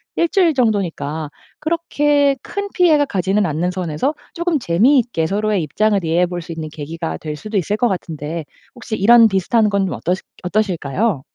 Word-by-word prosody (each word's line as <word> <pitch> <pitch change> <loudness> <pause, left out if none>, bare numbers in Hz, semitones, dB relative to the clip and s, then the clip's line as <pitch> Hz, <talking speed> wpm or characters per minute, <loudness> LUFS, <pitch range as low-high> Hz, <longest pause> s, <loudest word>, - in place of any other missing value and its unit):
1 340 - +2
주일 355 -7 +3
정도니까 170 - -1 0.3
그렇게 295 -3 +1
큰 405 0 -5
피해가 315 -5 +4
가지는 195 -2 0
않는 165 +2 -1
선에서 180 - -2 0.2
조금 340 -1 0
재미있게 235 - +2
서로의 205 0 0
입장을 200 +5 +1
이해해 165 +2 +2
볼 175 0 -5
수 170 - -9
있는 160 -1 -6
계기가 160 +2 -5
될 150 -1 -6
수도 215 +7 -4
있을 200 +3 0
거 245 +2 +2
같은데 160 -2 -5 0.3
혹시 225 -3 -5
이런 230 +3 +7
비슷한 210 +2 +2
건 200 -1 +1
좀 - - -3
어떠시 180 +2 -2 0.2
어떠실까요? 185 - 0
200 Hz, 365 characters per minute, -19 LUFS, 165-245 Hz, 0.3 s, 이런